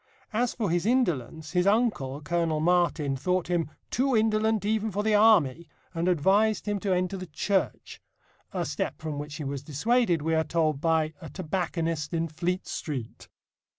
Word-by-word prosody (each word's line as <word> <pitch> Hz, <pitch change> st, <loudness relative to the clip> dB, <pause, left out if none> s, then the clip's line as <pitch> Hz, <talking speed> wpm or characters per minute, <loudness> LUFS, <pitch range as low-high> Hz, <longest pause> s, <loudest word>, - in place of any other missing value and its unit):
As 240 Hz, +3 st, 0 dB
for 210 Hz, -7 st, -1 dB
his 175 Hz, +3 st, 0 dB
indolence, 160 Hz, -, 0 dB
his 180 Hz, +1 st, +2 dB
uncle, 200 Hz, -, +1 dB
Colonel 165 Hz, 0 st, 0 dB
Martin, 165 Hz, -4 st, +2 dB
thought 180 Hz, +6 st, -1 dB
him 170 Hz, -3 st, 0 dB, 0.2 s
"too 260 Hz, 0 st, +2 dB
indolent 220 Hz, -1 st, +2 dB
even 220 Hz, +1 st, +1 dB
for 205 Hz, +1 st, -2 dB
the 220 Hz, 0 st, +2 dB
Army," 180 Hz, -8 st, +4 dB, 0.3 s
and 170 Hz, +1 st, -1 dB
advised 195 Hz, +6 st, +3 dB
him 205 Hz, -1 st, 0 dB
to 195 Hz, 0 st, -2 dB
enter 185 Hz, +1 st, 0 dB
the 185 Hz, 0 st, -7 dB
Church 190 Hz, +5 st, -2 dB, 0.5 s
a -, -, -2 dB
step -, -, -3 dB
from 155 Hz, -2 st, -4 dB
which 145 Hz, 0 st, -6 dB
he 150 Hz, -, -5 dB
was 140 Hz, -1 st, -4 dB
dissuaded, 170 Hz, -, +1 dB
we 160 Hz, +1 st, 0 dB
are 160 Hz, 0 st, +3 dB
told, 155 Hz, -4 st, 0 dB
by 160 Hz, -1 st, +1 dB
"a 160 Hz, -, -8 dB
tobacconist 165 Hz, -2 st, -2 dB
in 165 Hz, 0 st, 0 dB
Fleet 175 Hz, +4 st, -2 dB
Street." 130 Hz, -8 st, -6 dB
175 Hz, 170 wpm, -27 LUFS, 155-205 Hz, 0.5 s, Army